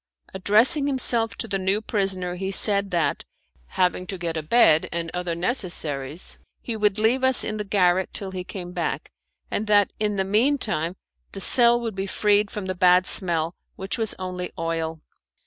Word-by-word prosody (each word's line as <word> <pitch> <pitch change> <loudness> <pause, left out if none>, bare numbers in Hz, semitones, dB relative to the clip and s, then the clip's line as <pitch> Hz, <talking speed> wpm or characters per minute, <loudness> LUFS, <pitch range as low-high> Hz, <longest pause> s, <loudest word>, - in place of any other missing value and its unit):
Addressing 225 - +3
himself 235 -5 +2
to - - -5
the 195 -2 -2
new 190 +2 +1
prisoner, 195 -4 -1
he 190 +2 -5
said 200 0 +4
that, 170 -3 -1 0.4
having 180 - -1
to 190 - -6
get 170 -2 -4
a 160 - -2
bed 160 -2 +3
and 165 -1 -4
other 180 -1 -3
necessaries, 170 - -2 0.2
he 235 - -5
would 210 -2 0
leave 230 +5 +1
us 260 -1 +5
in 215 - -4
the 210 - -3
garret 190 -2 +1
till 195 -2 -5
he 185 -1 -5
came 180 -1 -8
back, - - -4 0.4
and 215 - -2
that, 205 -1 +3
in 210 -1 0
the 190 -1 -1
mean 230 +9 +2
time, 175 - -3 0.4
the 195 - -7
cell 240 +4 +4
would 230 -2 -5
be 195 +1 -4
freed 205 +1 +1
from 205 -2 -6
the 185 - -3
bad 180 0 +3
smell, 170 -4 +2 0.2
which 195 +4 -4
was 220 -2 +1
only 180 -1 -5
oil. 165 -1 -3
195 Hz, 180 wpm, -23 LUFS, 180-215 Hz, 0.4 s, us